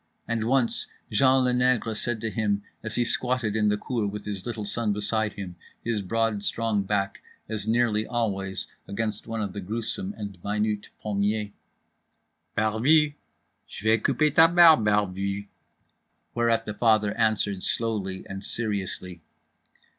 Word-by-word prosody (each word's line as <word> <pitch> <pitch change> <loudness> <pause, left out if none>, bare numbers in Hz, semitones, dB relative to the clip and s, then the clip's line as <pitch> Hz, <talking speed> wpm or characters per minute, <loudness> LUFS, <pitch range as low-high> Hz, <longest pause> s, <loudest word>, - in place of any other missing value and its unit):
And 115 -1 -1
once 130 -1 +1 0.2
Jean 130 +4 +4
Le 125 - +3
Nègre 125 -3 +2
said 115 +1 -2
to 115 - -2
him 105 -3 0 0.2
as 110 -1 -3
he 120 - +2
squatted 125 -4 0
in 105 -1 +3
the 105 - +1
cour 115 -2 -2
with 105 +1 -6
his 100 -1 -5
little 110 -3 -4
son 105 0 -1
beside 105 +1 -1
him, 95 -3 -7 0.3
his 115 -3 -1
broad 110 +1 0
strong 110 -1 0
back 100 0 -1 0.3
as 110 -1 -4
nearly 110 -2 +2
always 95 -5 -2 0.2
against 110 +1 -3
one 115 -1 -2
of 100 -2 -4
the 100 - -5
gruesome 115 - -4
and 100 -4 -7
minute 105 0 -1
pommiers— 105 0 -1 1.1
"Barbu! 135 +8 +3 0.6
j'vais 110 +2 +1
couper 155 -1 +2
ta 160 +1 +8
barbe, 165 -8 +7
barbu!" 100 -1 0 0.9
Whereat 115 -1 +1
the 105 - -4
father 105 -2 +3
answered 110 -4 +1
slowly 100 -5 +1
and 95 +1 -6
seriously. 95 -6 -3
110 Hz, 145 wpm, -26 LUFS, 100-115 Hz, 1.1 s, ta